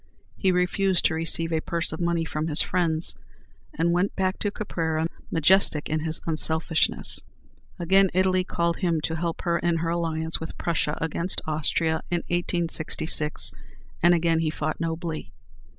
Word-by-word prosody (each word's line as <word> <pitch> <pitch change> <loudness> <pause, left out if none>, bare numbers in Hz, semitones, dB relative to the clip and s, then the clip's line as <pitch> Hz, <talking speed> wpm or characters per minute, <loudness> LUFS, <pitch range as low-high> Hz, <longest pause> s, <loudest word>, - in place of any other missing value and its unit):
He 190 - +1
refused 180 +1 +1
to - - +3
receive 165 +1 -1
a 160 - 0
purse 170 -1 -1
of 160 - -5
money 170 -1 0
from 155 0 -3
his 155 0 +1
friends, 170 -3 +1 0.6
and 165 +2 0
went 180 +3 0
back 185 0 -1
to 205 - -1
Caprera, 160 -6 -2 0.2
majestic 165 -2 +4
in 155 +1 0
his 160 +1 +1
unselfishness. 160 0 0 0.6
Again 190 +3 +3
Italy 185 0 +2
called 170 -2 -1
him 170 -4 0
to 160 +1 -2
help 165 0 -3
her 170 -1 +1
in 170 -1 0
her 165 0 -2
alliance 165 -1 -1
with 160 - -8
Prussia 160 -3 -1
against 170 +3 0
Austria 160 +1 0
in 175 -1 0
1866, 165 -3 +2 0.5
and 175 +1 +5
again 165 -1 +1
he 160 -1 0
fought 155 0 -3
nobly. 165 -1 -4
165 Hz, 155 wpm, -25 LUFS, 160-175 Hz, 0.6 s, and